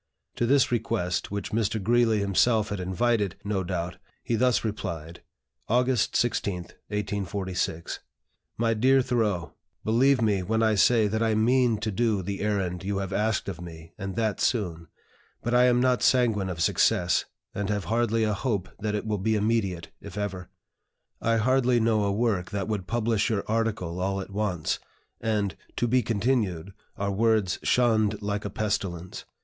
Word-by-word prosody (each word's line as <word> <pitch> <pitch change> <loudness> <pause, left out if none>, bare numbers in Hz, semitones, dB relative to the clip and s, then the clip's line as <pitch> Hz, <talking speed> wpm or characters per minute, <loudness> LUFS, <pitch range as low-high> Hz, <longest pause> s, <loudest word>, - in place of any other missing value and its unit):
To 120 - +1
this 135 0 +4
request, 105 -6 -1
which 100 0 -4
Mr. 110 0 0
Greeley 115 +1 +3
himself 105 +2 +2
had 105 -2 -3
invited, 100 +2 0
no 100 -2 -1
doubt, 90 -1 -3 0.3
he - - -2
thus 125 +2 +2
replied: 85 -6 -5 0.5
"August 125 0 +2
16, 105 -5 +1 0.3
1846. 100 -4 -3 0.6
"MY 115 0 +2
DEAR 130 +4 +4
THOREAU, 110 -9 0 0.3
Believe 130 +4 +3
me 105 -4 +2
when 110 +4 0
I 110 -1 +3
say 110 +1 +4
that 110 +2 -1
I 110 -1 +2
mean 120 +1 +3
to 110 0 -1
do 105 -2 +1
the 100 +2 -4
errand 95 -4 -1
you 100 +1 -2
have 95 0 -3
asked 105 +1 0
of 90 -3 -5
me, 80 -2 -10
and 95 -2 -5
that 110 -2 -1
soon. 85 -8 -1 0.6
But 120 - -1
I 125 0 +6
am 125 -1 +4
not 125 0 +2
sanguine 115 -7 +3
of 85 -2 -4
success, 85 0 +2 0.3
and 100 0 -3
have 105 -2 -1
hardly 115 +2 +1
a 105 -1 +1
hope 100 -3 -2
that 105 0 -1
it 105 - -3
will 105 -2 -1
be 110 +3 +1
immediate, 100 -5 0
if - - -9
ever. 95 -3 -4 0.7
I 115 0 +2
hardly 125 +1 +3
know 110 -2 +2
a 100 - +1
work 100 -4 0
that 100 -1 -3
would 105 -4 -3
publish 115 -2 +1
your 105 -3 0
article 110 -6 -1
all 95 +1 -1
at 95 - -7
once, 95 -6 -1 0.4
and 105 -3 -1 0.2
'to 120 - 0
be 125 +2 +3
continued' 105 -5 -1 0.2
are 100 0 -1
words 105 -2 +2
shunned 110 -4 +2
like 100 0 -2
a - - -2
pestilence. 95 -4 -3
105 Hz, 165 wpm, -27 LUFS, 95-115 Hz, 0.7 s, I